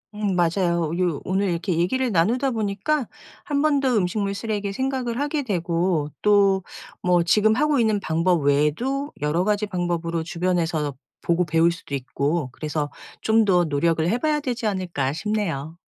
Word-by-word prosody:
음 205 -3 -1
맞아요. 170 -1 +1
요 175 -5 0
오늘 190 +1 0
이렇게 170 0 -1
얘기를 240 +8 +1
나누다 235 +11 +2
보니까 220 +5 -1 0.4
한번 290 -3 +1
더 265 - +2
음식물 200 +1 0
쓰레기 205 -1 -3
생각을 255 +1 -2
하게 290 +1 -1
되고 170 - 0
또 200 -2 +4 0.4
뭐 175 -1 +3
지금 215 +5 +3
하고 300 +2 +2
있는 220 -3 +2
방법 165 0 +1
외에도 155 - +1
여러 150 +4 +1
가지 210 +1 +1
방법으로 170 -3 -2
주변에서 165 -4 -1 0.3
보고 170 +1 +1
배울 165 +1 +3
수도 165 - -10
있고 140 +2 -2
그래서 150 0 -3 0.3
'좀 220 0 +3
더 180 -4 +3
노력을 160 +2 +1
해 225 - +1
봐야 300 +3 +1
되지 250 -5 -3
않을까?' 175 -9 -1
싶네요. 165 -5 -3
185 Hz, 330 characters per minute, -23 LUFS, 165-220 Hz, 0.4 s, 또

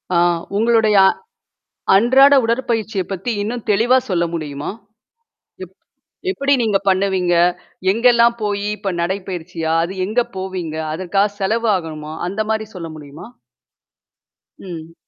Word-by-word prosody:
ஆ - - +4 0.4
உங்களுடைய 225 -2 +3
அ - - +7 0.9
அன்றாட 260 +7 +6
உடற்பயிற்சியைப் 225 -5 -1
பத்தி 195 +5 -3
இன்னும் 230 +3 -4
தெளிவா 230 +5 +4
சொல்ல 175 -3 +1
முடியுமா? 150 -3 -4 0.9
எப் 185 0 -12 0.6
எப்படி 280 -6 +1
நீங்கப் 200 -3 0
பண்ணுவீங்க? 190 -2 +1 0.6
எங்கெல்லாம் 235 +1 +4
போயி 205 0 -1
இப்ப 195 -2 -3
நடைப்பயிற்சியா? 175 -3 -3
அது 190 +3 -7
எங்க 220 +5 +1 0.2
போவீங்க? 185 -4 -4 0.2
அதற்காகச் 195 +4 -1
செலவு 225 +3 0
ஆகணுமா? 155 -3 -7
அந்த 200 +4 -2
மாதிரி 220 0 -2
சொல்ல 165 -2 -6
முடியுமா? 145 +4 -11 1.3
ம். 165 -3 -9
195 Hz, 115 wpm, -19 LUFS, 175-225 Hz, 1.3 s, அ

